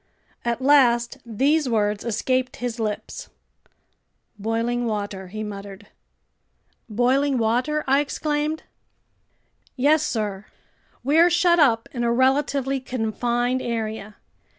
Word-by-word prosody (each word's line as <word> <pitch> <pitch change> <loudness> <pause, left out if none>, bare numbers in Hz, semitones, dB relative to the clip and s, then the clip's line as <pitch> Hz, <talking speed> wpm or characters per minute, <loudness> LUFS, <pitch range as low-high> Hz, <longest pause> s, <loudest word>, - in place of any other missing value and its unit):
At 235 +2 -2
last 260 -3 +4
these 270 +6 +1
words 210 -2 0
escaped 255 +3 -1
his 245 -1 -4
lips: 215 -2 -4 1.1
"Boiling 230 +3 -1
water!" 200 -3 -4
he 215 +4 -6
muttered. 200 -1 -8 1.0
"Boiling 260 +5 +2
water?" 245 +7 0
I 275 +1 +3
exclaimed. 300 +1 -2 1.1
"Yes, 290 +4 +3
sir. 210 -8 -3 0.6
We're 320 +6 +5
shut 345 0 +3
up 230 -7 +3
in 240 -2 -2
a 235 - +2
relatively 270 +2 +1
confined 245 +1 -1
area. 220 -3 -4
240 Hz, 105 wpm, -23 LUFS, 220-275 Hz, 1.1 s, We're